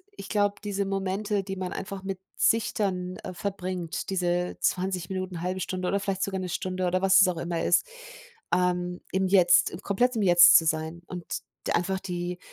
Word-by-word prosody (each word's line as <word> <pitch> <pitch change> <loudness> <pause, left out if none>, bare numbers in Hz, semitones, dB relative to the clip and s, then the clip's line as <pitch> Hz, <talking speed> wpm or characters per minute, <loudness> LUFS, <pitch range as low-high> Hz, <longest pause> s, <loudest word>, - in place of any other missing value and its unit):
ich - - -9
glaube, 205 -1 +1
diese 200 -1 -2
Momente, 195 +1 -1
die 195 0 -5
man 185 -1 -4
einfach 195 0 -6
mit 190 -1 -4 0.2
sich 225 -1 +2
dann, 185 -3 -2
äh, - - -6
verbringt, 185 -3 -4
diese 180 -1 -1
20 180 -1 -1
Minuten, 185 -2 -4
0,5 185 +1 -2
Stunde 185 +1 -3
oder 200 - +1
vielleicht 195 -1 -2
sogar 195 -1 -2
'ne 185 -1 -4
Stunde 185 +1 -2
oder 185 +1 0
was 195 0 +6
es 190 - +6
auch 175 -2 -1
immer 170 0 -2
ist, 175 - +3 0.7
ähm, 180 0 0
im 190 0 +1
Jetzt, 180 -3 +4
komplett 245 +5 +1
im 220 - 0
Jetzt 175 -1 +8
zu 165 - +2
sein 160 +2 -1
und 180 -2 -7 0.4
d - - 0
einfach 190 +2 0
die 180 -1 -4
185 Hz, 190 wpm, -27 LUFS, 180-195 Hz, 0.7 s, Jetzt